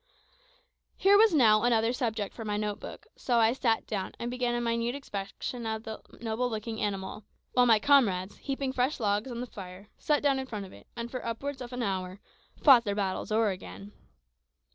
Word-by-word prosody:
Here 395 +1 +5
was 435 +1 +6
now 220 -9 +5
another 235 -1 +2
subject 225 -6 -2
for 225 - -7
my 210 -1 -2
note 210 -1 -2
book, - - -9
so 245 -2 0
I 225 0 +4
sat 230 -3 +1
down, 195 -4 -4
and 240 +1 -4
began 245 -1 -1
a - - 0
minute 235 +1 -1
inspection 225 -1 -5
of 220 0 -3
the 220 -1 -7 0.2
noble 230 +2 -1
looking 220 0 -4
animal, 200 0 -3 0.3
while 250 0 +5
my 225 -2 +7
comrades, 210 -8 +3
heaping 270 -1 -3
fresh 265 +3 0
logs 210 +2 0
on 240 -1 -5
the - - -3
fire, 195 -2 -10
sat 295 -1 +1
down 275 -2 +3
in 265 - -5
front 210 -5 -5
of 190 - -13
it, 100 - -15
and 235 0 -5
for 255 - -5
upwards 265 +4 -4
of 245 0 -7
an 250 -1 -3
hour, 190 -2 -3 0.4
"fought 260 -5 +8
their 205 -3 -2
battles 195 0 -2
o'er 220 -1 +3
again." 100 - -9
230 Hz, 200 wpm, -29 LUFS, 205-250 Hz, 0.4 s, fought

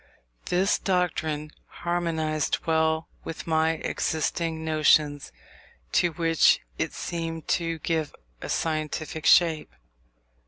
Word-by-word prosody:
This 190 +3 +2
doctrine 160 -5 -1 0.2
harmonized 165 -3 -1
well 160 0 +1 0.2
with 165 - -7
my 160 0 +2
existing 160 0 -2
notions, 155 -2 +2 0.6
to 175 - +3
which 165 0 +4 0.2
it - - -1
seemed 165 -2 -4
to 165 -2 0
give 160 -1 -2 0.3
a - - -6
scientific 155 0 -2
shape. 165 -3 +4
160 Hz, 95 wpm, -26 LUFS, 155-165 Hz, 0.6 s, which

